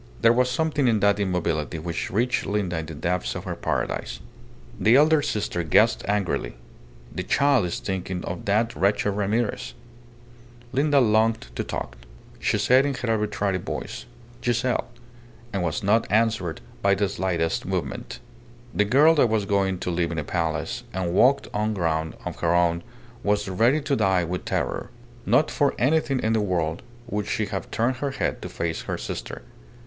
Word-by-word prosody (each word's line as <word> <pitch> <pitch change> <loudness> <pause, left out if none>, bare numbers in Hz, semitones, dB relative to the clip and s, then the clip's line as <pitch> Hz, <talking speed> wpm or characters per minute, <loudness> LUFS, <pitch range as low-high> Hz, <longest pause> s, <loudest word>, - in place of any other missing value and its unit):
There 115 0 +7
was 125 +1 +2
something 155 -1 +1
in 110 -3 +3
that 100 0 +3
immobility 90 -4 -1
which 85 +1 -3
reached 125 +5 0
Linda 100 -5 -1
in 80 - -6
the 80 - -7
depths 90 +4 -1
of - - -5
her - - -4
paradise. - - -2 0.6
The 110 +3 +5
elder 155 +2 +5
sister 105 -8 -2
guessed 80 -3 +3
angrily: 95 -12 -1 0.6
the - - -3
child 140 -9 +3
is 85 - -3
thinking 95 -2 -4
of 85 0 -5
that 110 +3 +1
wretched 100 +1 +2
Ramirez. 105 +3 -1 1.0
Linda 140 +2 +3
longed 110 - +2
to - - -1
talk. - - -5 0.4
She - - +1
said 130 +2 +4
in 140 -1 -1
her 120 -2 -2
arbitrary 105 -3 0
voice, - - -6 0.4
"Giselle!" 120 +1 0 0.7
and 100 - -1
was 85 0 -2
not 105 +3 +3
answered 110 -7 +1 0.2
by 100 0 +4
the 100 +1 +1
slightest 90 -4 -1
movement. - - -4 0.5
The 105 - +2
girl 145 +9 +6
that 140 -7 +3
was 110 -2 +1
going 95 -1 +1
to 90 - -2
live 85 0 0
in 85 - -4
a 75 - -1
palace 80 0 -2
and 90 -2 -2
walk 140 +7 +4
on 105 +1 0
ground 80 -3 -1
of - - -5
her 85 0 +2
own 85 -1 +2 0.4
was 105 0 0
ready 115 +10 +2
to 140 -1 0
die 95 -6 +2
with 90 +2 -4
terror. - - -2 0.4
Not - - +3
for - - +1
anything 140 0 +2
in 110 - +1
the 110 - +2
world 85 -5 -1 0.2
would 105 -3 -3
she 110 - 0
have 95 -1 -5
turned 120 +3 0
her 140 +3 -2
head 135 - -2
to - - -6
face 85 -1 -3
her - - -4
sister. - - -6
100 Hz, 175 wpm, -25 LUFS, 90-120 Hz, 1.0 s, There